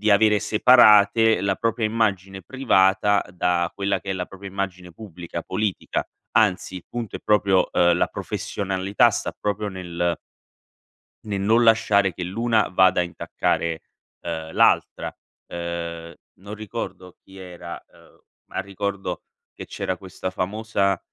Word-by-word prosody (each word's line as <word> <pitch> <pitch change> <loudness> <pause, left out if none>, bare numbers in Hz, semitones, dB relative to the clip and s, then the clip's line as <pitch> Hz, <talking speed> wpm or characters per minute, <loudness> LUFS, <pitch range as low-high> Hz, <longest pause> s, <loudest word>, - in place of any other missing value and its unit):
di 105 +1 +2
avere 105 +1 +5
separate 110 -1 +5
la 95 -1 0
propria 115 0 -1
immagine 100 -4 -1
privata 100 -4 +2
da 90 -1 0
quella 100 -1 -1
che 95 - -12
è - - +1
la 90 -1 -3
propria 100 0 -10
immagine 95 -2 -5
pubblica 85 -3 -8
politica. 100 0 -2 0.3
Anzi, 95 -3 +1
il 90 - -9
punto 120 -4 -5
è - - -9
proprio 100 -3 +3
uhm, 85 0 +3
la - - +3
professionalità 95 0 0
sta - - -3
proprio 105 0 -2
nel 85 -2 -3 1.1
Nel 100 -2 -3
non 110 +4 +3
lasciare 105 -4 +3
che 90 - -5
l'una 110 +4 +1
vada 95 0 +4
a - - +1
intaccare, 85 -1 -2 0.4
uhm, 80 -1 -5
l'altra. - - +2 0.4
Uhm, 85 -1 -5 0.2
non 100 +2 -8
ricordo 95 -3 -7
chi 95 0 -16
era, 90 -2 -9
uhm, - - -22 0.3
ma - - -4
ricordo 100 0 -4 0.3
che - - -9
c'era 95 - -3
questa 95 0 -6
famosa 100 0 -1
95 Hz, 140 wpm, -23 LUFS, 90-105 Hz, 1.1 s, avere